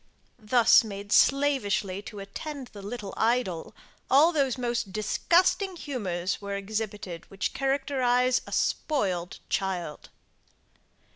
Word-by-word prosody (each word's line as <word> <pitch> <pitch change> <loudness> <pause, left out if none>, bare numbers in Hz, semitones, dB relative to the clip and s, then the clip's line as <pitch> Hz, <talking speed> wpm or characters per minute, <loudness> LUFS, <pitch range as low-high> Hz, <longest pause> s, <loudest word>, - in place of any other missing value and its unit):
Thus 230 +2 +5
made 205 -1 -7
slavishly 240 -10 +2
to 210 0 -10
attend 255 +7 -7
the 205 - -9
little 205 -1 -6
idol, 225 -7 0 0.3
all 295 +6 +6
those 275 -6 +1
most 240 -4 -2
disgusting 350 - +2
humours 195 - -3
were 200 0 -4
exhibited 200 -4 -5
which 195 0 -3
characterize 260 -2 +1
a - - -9
spoiled 190 - -1
child. 180 -6 -3
220 Hz, 110 wpm, -27 LUFS, 195-270 Hz, 0.3 s, all